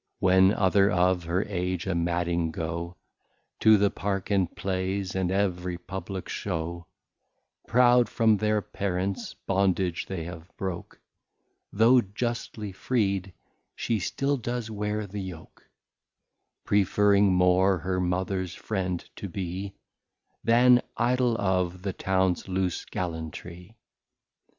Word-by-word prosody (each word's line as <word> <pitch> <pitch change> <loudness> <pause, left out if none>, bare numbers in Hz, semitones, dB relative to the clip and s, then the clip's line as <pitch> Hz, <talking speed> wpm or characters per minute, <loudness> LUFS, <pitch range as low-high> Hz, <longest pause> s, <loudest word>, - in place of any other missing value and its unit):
When 95 +1 +5
other 100 -1 +3
of 90 -2 +2
her 90 +4 0
Age 90 -3 -2
a 95 - -1
madding 85 0 0
go, 85 +2 -4 0.6
To 110 -1 +6
th' 100 0 +2
Park 100 0 -3
and 95 -4 +2
Plays, 95 0 -2
and 95 -2 0
ev'ry 90 -2 -1
publick 95 +1 -6
Show, 85 -2 -4 0.8
Proud 125 0 +5
from 110 -3 +3
their 105 0 +1
Parents 95 0 -3
Bondage 95 -2 +1
they 95 -4 -4
have 85 0 -9
broke, 95 -3 -5 0.7
Though 115 +4 +5
justly 110 0 -4
freed, 95 -2 -1 0.4
she 115 -2 -1
still 140 +9 -1
does 120 -2 -4
wear 105 0 -2
the 100 +1 -6
Yoke; 90 -4 -10 1.0
Preferring 100 0 +3
more 90 +1 +4
her 90 +3 -2
Mothers 90 0 -1
Friend 90 -5 -3
to 100 - -6
be, 95 +2 -5 0.7
Than 120 +2 +6 0.2
Idol 120 0 +2
of 90 -2 0
the 100 -2 -2
Towns 95 -1 0
Loose 95 -1 -1
Gallantry. 85 +4 -6
95 Hz, 115 wpm, -27 LUFS, 90-105 Hz, 1.0 s, To